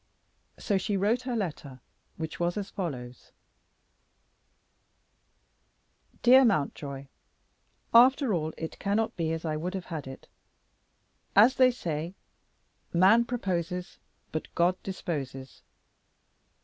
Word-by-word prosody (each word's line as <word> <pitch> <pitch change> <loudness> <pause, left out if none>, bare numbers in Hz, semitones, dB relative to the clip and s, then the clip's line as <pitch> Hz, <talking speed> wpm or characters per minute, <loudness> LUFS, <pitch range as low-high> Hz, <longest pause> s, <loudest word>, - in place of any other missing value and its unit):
So 200 -3 0
she 200 +1 -1
wrote 215 +6 +1
her 245 - -1
letter, 155 - -4 0.4
which 160 -1 -5
was 175 +2 0
as 200 -1 -4
follows: 125 -10 -6 2.9
"Dear 260 +2 +8
Mountjoy, 140 - -1 0.9
After 255 0 +6
all 160 -3 -1
it 160 - -6
cannot 210 +2 0
be 165 -3 -1
as 165 0 -4
I 155 -1 -1
would 180 +5 -4
have 190 - -5
had 150 -4 -5
it. 135 - -10 1.1
As 220 +6 +7
they 255 -1 +6
say, 170 -6 -4 0.8
'Man 195 +7 +5
proposes, 180 -7 -3 0.3
but 155 - -4
God 180 +2 +2
disposes.' 140 -9 -6
180 Hz, 110 wpm, -28 LUFS, 155-210 Hz, 2.9 s, Dear